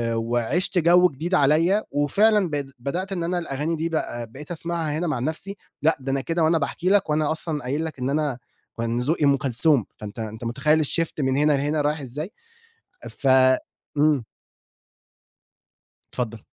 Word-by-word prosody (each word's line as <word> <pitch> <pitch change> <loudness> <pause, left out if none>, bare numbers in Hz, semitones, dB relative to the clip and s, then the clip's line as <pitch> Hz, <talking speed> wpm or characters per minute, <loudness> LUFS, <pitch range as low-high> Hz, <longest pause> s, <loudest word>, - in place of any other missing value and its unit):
وعشت 120 - 0
جو 175 +2 +5
جديد 165 +6 -2
عليّا 165 +7 +3
وفعلًا 195 +7 +3
بق 145 -2 -2
بدأت 175 +10 -3
إن 180 -3 -2
أنا 175 +1 -1
الأغاني 155 0 -2
دي 165 +2 -1
بقى 120 -7 -3
بقيت 150 +6 -10
أسمعها 165 -2 -3
هنا 175 - -1
مع 155 - -1
نَفْسي، 160 +9 -4 0.3
لأ 160 +2 +3
ده 135 +1 -3
أنا 135 0 0
كده 165 +3 -1
وأنا 160 +1 +4
باحكي 165 +4 -1
لك 200 -4 +3
وأنا 150 0 +1
أصلًا 155 -1 -3
قايل 145 +6 -2
لك 155 -4 -7
إن 125 +1 -1
أنا، 145 -3 0 0.4
كان 115 0 -1
ذوقي 145 +5 +1
أُم 140 -1 +4
كلثوم 135 - +2
فأنت 105 +1 -8
أنت 110 +1 -6
متخيّل 150 +6 +2
الshift 165 +3 0
من 130 -1 +1
هنا 150 +1 +4
لهنا 145 +2 0
رايح 150 +1 0
إزاي، 145 - -6 0.8
ف 135 - -4 0.7
امم. 145 -3 +3 1.9
اتفضل. 115 -3 -4
150 Hz, 165 wpm, -24 LUFS, 135-165 Hz, 1.9 s, جو